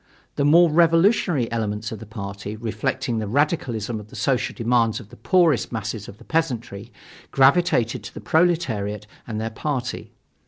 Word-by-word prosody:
The 140 - 0
more 165 +3 +6
revolutionary 165 - +3
elements 110 -2 -2
of 110 - -6
the 115 - -10
party, 100 -1 -6
reflecting 115 +2 -2
the 110 - -3
radicalism 120 - -1
of 105 - -11
the - - -14
social 135 -3 0
demands 115 0 +1
of 110 -4 -13
the - - -13
poorest 160 - +2
masses 110 -2 -4
of 100 - -11
the 120 - -16
peasantry, 120 -9 -2 0.4
gravitated 135 -4 +3
to - - -9
the - - -6
proletariat 120 - 0 0.2
and 110 -2 -4
their 110 +1 -3
party. 125 0 -4
120 Hz, 160 wpm, -23 LUFS, 110-150 Hz, 0.4 s, more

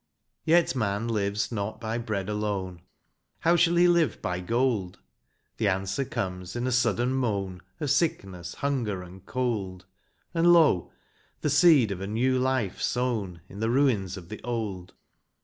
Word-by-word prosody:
Yet 165 -3 +4
man 110 -2 -1
lives 105 -1 -1
not 105 -1 -3
by 115 0 -3
bread 105 -5 -3
alone, 100 -4 -3 0.3
— 70 +3 -49
How 170 +1 +4
shall 170 0 +4
he 175 +1 +6
live 170 -2 +2
by 90 0 -2
gold? 115 -2 0 0.6
The 110 - +1
answer 95 +6 0
comes 90 -4 -4
in 120 +1 -2
a 130 - 0
sudden 120 0 +2
moan 100 -8 -1 0.2
Of 145 -3 -1
sickness, 95 - -1
hunger, 120 -10 -2
and 90 +1 -13
cold; 100 -8 -2 0.5
And, 170 0 +4
lo! 160 - +4 0.5
the 150 - 0
seed 145 - +6
of 95 -1 -4
a 95 - -3
new 125 +5 +1
life 130 -7 0
sown 110 -9 -1
In 100 - -10
the 110 +1 0
ruins 115 -8 +1
of 90 -2 -11
the 110 - -7
old 105 -7 -4
110 Hz, 160 wpm, -27 LUFS, 95-130 Hz, 0.6 s, he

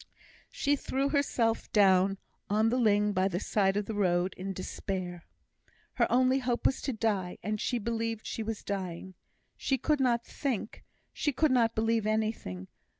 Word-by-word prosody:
She 285 0 +1
threw 275 0 -1
herself 245 -6 0
down 195 -1 +4 0.3
on 215 +2 +3
the 245 - +1
ling 210 -2 +3
by 185 0 +2
the 180 -2 -2
side 195 -1 +1
of 205 - -1
the 220 - -4
road 180 -2 +1
in 195 +2 -5
despair. 185 -2 -5 0.7
Her - - +1
only 255 +2 +4
hope 245 -2 -2
was 270 - +2
to 270 - -1
die, 205 -5 -1
and 210 +2 -2
she 245 - 0
believed 230 0 -2
she - - -4
was 220 -1 -4
dying. 190 -2 -4 0.4
She 270 - 0
could 300 +3 +1
not 240 -3 +2
think; 250 -7 -4 0.3
she 295 - 0
could 285 +1 +2 0.2
believe 225 -1 +1
anything. 215 - -2
215 Hz, 160 wpm, -30 LUFS, 195-240 Hz, 0.7 s, down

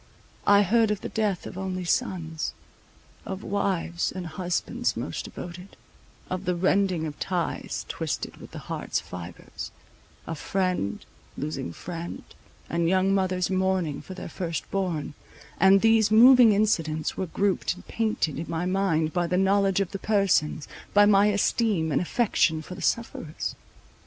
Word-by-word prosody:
I 205 0 +7
heard 225 +3 +3
of 210 -1 -1
the - - -5
death 210 -5 -1
of 185 - -7
only 185 -1 -3
sons; 170 -6 -1 0.7
of 190 0 -6
wives 185 -4 -1
and 185 -1 -6
husbands 175 +2 -2
most - - -4
devoted; 180 +2 -9 0.5
of 185 +1 -4
the 180 - +1
rending 185 -2 +2
of 150 -2 -6
ties 180 -3 -2
twisted - - -4
with - - -11
the - - -9
heart's - - -2
fibres, 90 -1 -8 0.6
of 165 -2 -5
friend 185 - -1 0.3
losing 80 +2 -4
friend, 170 - -7 0.4
and 170 0 0
young 190 +1 +3
mothers 185 -1 +1
mourning 185 -5 0
for 185 - -9
their 185 - -7
first 170 -4 -4
born; 180 -7 -2 0.5
and 195 +2 +6
these 225 -1 +4
moving 240 +1 +8
incidents 165 -7 +1
were 190 - -2
grouped 195 +2 0
and 185 - -14
painted 215 -10 -1
in 165 - -5
my 165 +1 -1
mind 180 -4 +1
by 175 -1 +1
the 180 - 0
knowledge 195 0 +3
of 195 - -2
the 195 - -5
persons, 195 -8 +1 0.3
by 205 0 +8
my 205 0 +5
esteem 205 -4 +1
and - - +2
affection 175 -5 +1
for 180 - -8
the - - -9
sufferers. 195 -9 -2
185 Hz, 150 wpm, -26 LUFS, 165-200 Hz, 0.7 s, moving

